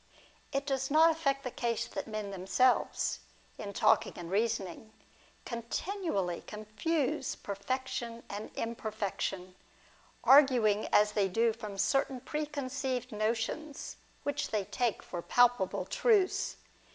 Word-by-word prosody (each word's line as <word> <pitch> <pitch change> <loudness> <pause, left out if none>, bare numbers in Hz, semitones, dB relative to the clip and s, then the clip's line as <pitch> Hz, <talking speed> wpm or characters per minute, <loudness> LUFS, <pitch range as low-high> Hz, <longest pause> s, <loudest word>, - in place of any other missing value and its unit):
It 275 0 -1
does 270 -1 -1
not 320 +3 +6
affect 275 -4 0
the 250 - -4
case 235 -1 -1
that - - -5
men 215 -2 -4
themselves, 195 +7 +1 0.4
in 200 - -5
talking - - +3
and 175 -1 -7
reasoning, 215 -1 -1 0.5
continually 235 - -2
confuse 215 +8 -1
perfection 235 +3 -4
and 205 +1 -6
imperfec 220 -3 -3
tion, 185 -1 -3 0.7
arguing 250 -7 +6
as 210 0 +4
they 205 -2 +2
do 225 +4 +2
from 215 -3 -7
certain 260 +6 +1
preconceived 270 -3 -3
notions, 225 +8 -2 0.3
which 285 - -1
they 210 -3 -1
take 235 +3 -1
for 175 - -5
palpable 245 -2 +3
truths. 415 -6 +2
235 Hz, 115 wpm, -32 LUFS, 210-270 Hz, 0.7 s, not